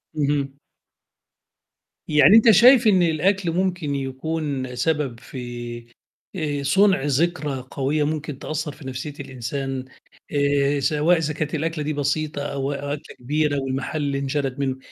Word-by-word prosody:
اهم. 140 -2 0 1.5
يعني 150 +7 +6
أنت 225 0 +7
شايف 240 +3 +7
إن 190 -3 +5
الأكل 175 +3 +1
ممكن 175 -5 -1
يكون 135 -1 -3
سبب 145 -5 -1
في 120 -2 -7 0.5
آآ 145 -4 -2
صُنع 190 +4 +4
ذكرى 145 -1 0
قوية 145 +2 0
ممكن 150 -2 -3
تأثّر 155 0 -3
في 135 -1 -11
نَفسيّة 130 +3 -5
الإنسان 135 0 -4 0.5
آآ، 140 0 +2
سواء 155 +5 +2
إذا 150 -2 -1
كانت 155 +1 -3
الأكلة 160 0 -2
دي 155 +1 -2
بسيطة، 145 +1 -1
أو 140 -1 -3
أكلة 145 +2 -5
كبيرة، 145 +2 0
والمحل 135 +3 -3
اللي 140 -1 -1
انشَرَت 135 -1 -2
مِنّه، 135 -1 -1
145 Hz, 135 wpm, -23 LUFS, 135-155 Hz, 1.5 s, أنت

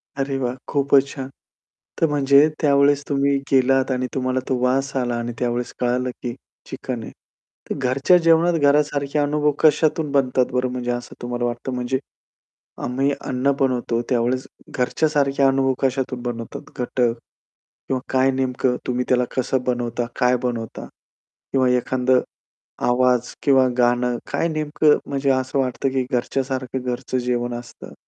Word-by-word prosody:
अरे 135 -1 -2
वाह! 125 -1 -2
खूपच 140 -1 +3
छान! 135 -2 -7 0.7
तर 165 - +5
म्हणजे 140 0 +5
त्यावेळेस 140 -1 +4
तुम्ही 140 0 +2 0.2
गेलात 135 0 +3
आणि 130 0 -1
तुम्हाला 130 0 0
तो 130 - +1
वास 135 +2 +1
आला 120 -2 0
आणि 120 0 -4
त्यावेळेस 120 0 -2
कळालं 125 +1 0
की 120 -1 -3 0.4
चिकन 120 -4 -5
आहे. - - -8 0.6
तर - - -2
घरच्या 135 +7 +3
जेवणात 165 +1 +4
घरासारखे 145 0 +2
अनुभव 150 +1 +2
कशातून 155 -1 +3
बनतात 130 -2 +2
बरं 125 0 +1
म्हणजे 125 -1 -2
असं 120 0 -5
तुम्हाला 120 0 -2
वाटतं? 120 +2 -3
म्हणजे, 125 +1 -1 0.8
आम्ही 135 +3 0
अन्न 130 +2 0
बनवतो 125 -3 0
त्यावेळेस 125 +1 0 0.2
घरच्यासारख्या 140 +1 +1
अनुभव 135 0 +2
कशातून 130 -1 -1
बनवतात 115 -2 -5 0.2
घटक 125 0 -2 0.9
किंवा 130 -1 0
काय 130 +1 +4
नेमकं 130 -1 0
तुम्ही 125 0 -1
त्याला 125 -1 +3
कसं 130 0 0
बनवता, 120 -1 -1
काय 125 0 +4
बनवता 115 -3 -4 0.7
किंवा 130 -2 +3
एखादं 125 +1 +2 0.7
आवाज 125 0 +2
किंवा 135 -2 +5
गाणं 120 0 +2
काय 170 - +1
नेमकं 155 -1 +2
म्हणजे 140 0 -1
असं 130 +1 0
वाटतं 130 +1 0
की 130 -1 -1
घरच्यासारखं 130 +1 -2
घरचं 125 +1 -3
जेवण 120 0 -1
असतं. 120 0 -10
130 Hz, 140 wpm, -22 LUFS, 125-140 Hz, 0.9 s, तर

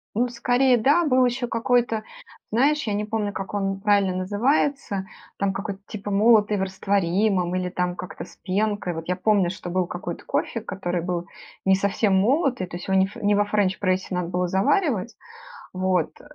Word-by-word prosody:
Ну, 245 +2 +2
скорее, 245 +1 +2
да. 290 +9 +3
Был 255 -2 +4
еще 245 0 -1
какой-то, 230 -1 +1 0.5
знаешь, 285 +6 +2
я 210 - -2
не 210 +1 -1
помню, 210 -1 -2
как 195 +1 -6
он 195 -1 -1
правильно 200 -2 +2
называется, 205 +1 0 0.3
там 200 -1 0
какой-то, 200 -1 -5
типа 205 -1 -6
"молотый 210 0 +4
в - - -2
растворимом", 190 -1 0
или 180 0 -1
там 180 0 -2
как-то 180 - -7
"с - - -16
пенкой". 200 -1 -1
Вот 165 +1 -7
я 180 - 0
помню, 190 -2 +2
что 185 -1 -6
был 180 0 0
какой-то 175 -1 -6
кофе, 230 - -1
который 180 -5 -3
был 175 0 -3 0.4
не 190 0 +5
совсем 200 0 +1
молотый, 250 - +1
то 175 - -8
есть 175 - -7
его 190 0 +2
не 190 - +5
ф 200 - -10
не 205 0 +2
во 205 0 +3
френч-прессе 190 -2 0
надо 180 -1 -1
было 180 0 -1
заваривать, 230 - +1 0.6
вот, 185 -3 -1
200 Hz, 180 wpm, -24 LUFS, 185-225 Hz, 0.6 s, не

